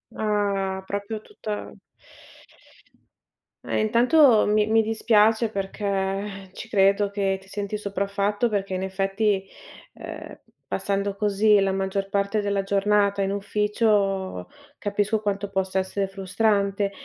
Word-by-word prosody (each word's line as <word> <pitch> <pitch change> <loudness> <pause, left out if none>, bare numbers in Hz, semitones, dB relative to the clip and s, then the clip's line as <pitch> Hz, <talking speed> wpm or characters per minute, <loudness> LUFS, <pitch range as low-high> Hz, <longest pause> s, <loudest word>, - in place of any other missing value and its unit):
Ah, 200 -3 -1
proprio 205 +2 -4
tutta 215 - -6 1.9
Eh - - -1
intanto 235 +2 +5
mi 210 0 +2
mi 225 0 +4
dispiace 220 0 +3
perché 195 -1 -3
ci 220 - -9
credo 200 0 +3
che 195 -1 -1
ti 190 - -19
senti 200 +1 -4
sopraffatto, 200 +2 -1
perché 195 -2 -2
in 185 - -3
effetti, 195 +1 0 0.5
ehm, - - -9 0.3
passando 200 0 -1
così 210 0 +3
la 195 0 +2
maggior 195 +1 -2
parte 200 +2 0
della 200 -1 0
giornata 200 0 +2
in 195 - -1
ufficio, 200 -1 0 0.3
capisco 205 +1 -1
quanto 200 -1 -2
possa 190 -1 -1
essere 195 +1 -2
frustrante, 200 +1 0
200 Hz, 115 wpm, -24 LUFS, 195-210 Hz, 1.9 s, intanto